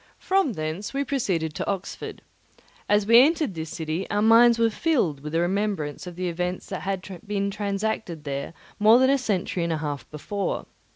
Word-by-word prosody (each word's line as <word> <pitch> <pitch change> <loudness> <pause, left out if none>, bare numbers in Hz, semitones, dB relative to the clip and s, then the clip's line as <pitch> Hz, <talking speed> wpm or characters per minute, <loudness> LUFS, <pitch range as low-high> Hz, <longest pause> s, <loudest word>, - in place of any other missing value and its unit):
From 380 -9 +1
thence 160 +8 -4
we 280 - +1
proceeded 190 - -1
to - - -3
Oxford. 195 -1 -5 0.7
As 205 -1 +3
we 230 +3 +8
entered 305 - +1
this 160 -1 -5
city, 160 +3 -4
our 205 +1 +1
minds 230 +1 +6
were 230 -1 +3
filled 215 - +1
with 150 +2 -7
the 165 - +2
remembrance 185 -4 -1
of 175 - -7
the 180 +1 -2
events 180 +1 -3
that 190 - -4
had 190 -1 -3 0.2
been 200 -1 -1
transacted 200 -5 -3
there 140 +1 -4 0.3
more 215 +3 +7
than 260 +1 +4
a 275 - +3
century 190 -6 -1
and 170 - -1
a - - -1
half 145 -2 -5
before. 195 +6 -3
195 Hz, 185 wpm, -25 LUFS, 165-225 Hz, 0.7 s, we